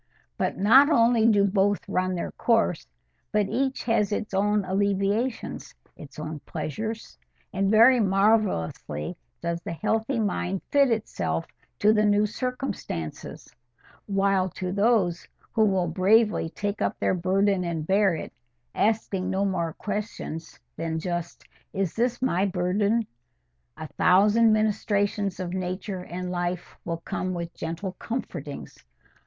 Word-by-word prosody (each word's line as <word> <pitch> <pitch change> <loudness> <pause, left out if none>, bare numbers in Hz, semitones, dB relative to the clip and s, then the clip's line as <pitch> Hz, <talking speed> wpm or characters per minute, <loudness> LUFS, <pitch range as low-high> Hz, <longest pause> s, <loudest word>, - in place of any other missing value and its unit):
But - - -1
not 260 +9 +6
only 230 -5 +4
do 205 -3 +4
both 200 0 +1
run 185 0 0
their 170 - -3
course, 225 -8 +1 0.4
but 210 -2 +2
each 265 +5 -1
has 225 -4 +1
its 210 0 -3
own 205 +1 +1
alleviations, 200 +5 -1 0.2
its 145 - -12
own 155 0 -5
pleasures; 215 +11 -5 0.3
and 195 0 +1
very 230 +4 +6
marvellously 195 - +1 0.3
does 170 0 -2
the 170 - -5
healthy 220 - -1
mind 195 -3 -1
fit 280 -2 +5
itself 225 -1 -1 0.3
to 210 0 +4
the 210 -1 +3
new 205 0 +3
circumstances; 235 - -5 0.5
while 195 -2 +2
to 180 +1 -5
those 200 -4 +1 0.3
who 220 - +4
will 190 -3 +1
bravely 195 +2 +3
take 205 +4 -4
up - - -1
their - - +1
burden 190 +2 +1
and 165 -3 -3
bear 195 0 +3
it, - - -7 0.4
asking 200 -3 0
no 190 +1 0
more 170 -4 -1
questions 205 -6 -5 0.2
than 165 -1 -2
just, 175 +1 -4 0.3
"Is 195 -3 -1
this 245 +1 -1
my 195 -5 +2
burden?" 200 +5 +1 0.7
a 155 - -6
thousand 205 +9 +4
ministrations 205 -2 0
of 180 -1 -4
nature 185 +1 -4
and 180 +1 -5
life 175 0 -3
will 170 -1 -3
come 185 0 -3
with 170 -1 -5
gentle 170 +4 -4
comfortings. 170 - -6
195 Hz, 135 wpm, -26 LUFS, 180-215 Hz, 0.7 s, not